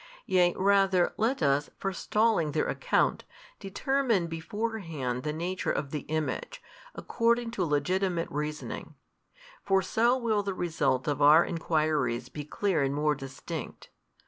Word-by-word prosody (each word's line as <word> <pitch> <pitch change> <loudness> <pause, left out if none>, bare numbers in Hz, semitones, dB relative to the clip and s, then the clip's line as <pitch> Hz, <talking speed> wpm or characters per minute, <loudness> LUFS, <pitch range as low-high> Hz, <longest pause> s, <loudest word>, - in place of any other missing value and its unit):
Yea 180 -1 +3
rather 195 -2 +3
let 225 - 0
us 140 +1 +2
forestalling 195 -3 0
their - - +1
account, - - +1 0.4
determine 230 0 0
beforehand 165 - -4
the 150 - -2
Nature 175 +4 -2
of 140 - -3
the 150 -3 -5
Image, 155 - -3 0.4
according 235 0 0
to 205 -6 -1
legitimate 175 +3 0
reasoning: 150 +1 -5 0.7
for 195 -1 +2
so 235 +7 +2
will 225 -4 +1
the 195 -1 -3
result 160 -7 0
of 145 -1 -1
our 150 +4 +7
enquiries 155 -7 0
be 150 +3 -6
clear 170 +2 0
and 135 0 0
more 150 +1 +2
distinct. 135 +2 -7
170 Hz, 130 wpm, -28 LUFS, 150-200 Hz, 0.7 s, our